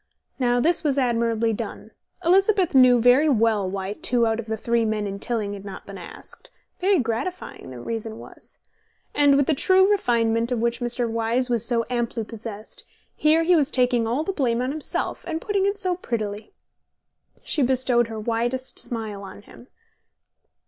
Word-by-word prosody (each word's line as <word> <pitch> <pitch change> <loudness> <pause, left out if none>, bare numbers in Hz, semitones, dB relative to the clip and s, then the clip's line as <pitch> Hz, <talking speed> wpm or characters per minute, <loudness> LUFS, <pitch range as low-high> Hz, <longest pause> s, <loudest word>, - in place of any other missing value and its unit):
Now 245 -1 +2
this 330 +6 +1
was 285 -3 +1
admirably 230 -3 +1
done. - - -6 0.3
Elizabeth 385 0 +3
knew 255 -2 +6
very 250 +6 +5
well 220 -6 +2
why 195 +1 -4
two 240 +2 +1
out 225 0 0
of 230 - -6
the 220 0 -2
three 235 +1 0
men 215 -1 -1
in 200 0 -5
Tilling 215 -3 -2
had 200 -1 -8
not 195 -1 -9
been - - -9
asked - - -11 0.3
(very 385 +1 +3
gratifying, 260 - -4
that 125 -2 -9
reason 225 - -5
was), - - -13 0.6
and 285 -1 +4
with 280 - +3
the 315 - +2
true 380 +7 +4
refinement 230 - +1
of 245 - +1
which 235 +1 0
Mr. 240 0 -1
Wyse 230 +2 -1
was 235 -3 +1
so 235 -1 0
amply 240 -2 -2
possessed, 215 -1 -9 0.3
here 315 +2 +3
he 355 +2 +4
was 295 -4 +2
taking 250 -4 +2
all 250 +7 0
the 390 - -3
blame 240 -8 0
on 255 +2 -1
himself, 305 0 -3
and 325 -2 -2
putting 400 +1 0
it 400 +1 -1
so 370 -3 0
prettily. 215 - -4 0.9
She 300 - 0
bestowed 250 -2 +2
her 225 -1 -6
widest 240 +4 -2
smile 220 -4 -5
on 200 +1 -11
him. 240 - -16
240 Hz, 175 wpm, -24 LUFS, 225-280 Hz, 0.9 s, knew